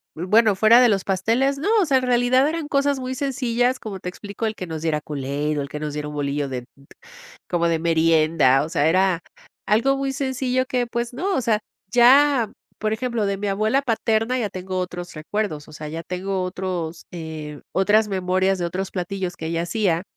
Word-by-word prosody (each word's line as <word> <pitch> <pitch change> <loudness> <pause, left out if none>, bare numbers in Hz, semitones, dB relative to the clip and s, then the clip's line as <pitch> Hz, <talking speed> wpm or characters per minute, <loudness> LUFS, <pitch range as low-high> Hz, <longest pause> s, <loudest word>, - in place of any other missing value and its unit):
bueno, 210 +5 +3
fuera 220 +5 +6
de 245 - +6
los 195 -3 +1
pasteles, 230 +9 +1
no, 315 - -2
o - - +2
sea, 275 -4 +3
en - - -6
realidad 250 +2 +3
eran 325 -1 -3
cosas 280 -1 +1
muy 255 0 -4
sencillas, 255 -2 0
como 200 -3 -6
te 180 - -5
explico, 205 +4 -5
el 220 - -3
que 185 - -5
nos 160 -2 -6
diera 155 -2 0
Kool-Aid, 145 +1 -3
o - - 0
el 140 - -6
que 150 - -6
nos 150 -1 -4
diera 150 0 -4
un 150 - -7
bolillo 145 0 -2
de 130 -2 -4
p - - -22 0.8
como 170 -1 +1
de 165 -1 +1
merienda, 160 -4 +3
o 155 - -7
sea, 150 -1 +2
era 185 0 +2 0.5
algo 235 +7 +2
muy 275 0 -1
sencillo 260 -1 -1
que, 255 -2 -1
pues, 235 +1 -3
no, 370 +9 -1
o - - +1
sea, 220 -2 +2 0.3
ya, 255 -1 +5 0.3
por 215 0 0
ejemplo, 235 -2 -1
de 200 0 -1
mi 205 +1 -3
abuela 215 +7 +1
paterna, 225 0 0
ya 225 -4 -1
tengo 185 -1 -5
otros 180 -1 -5
recuerdos, 155 -1 -3
o - - -13
sea, 155 0 -7
ya 165 +2 -5
tengo 185 +2 -3
otros, 180 -3 -4
eh, 155 -3 -7
otras 210 +3 +3
memorias 190 0 +1
de 175 - -2
otros 185 +3 -3
platillos 185 0 -4
que 160 - -6
ella 165 0 -1
hacía, 175 -3 0
195 Hz, 210 wpm, -22 LUFS, 165-245 Hz, 0.8 s, fuera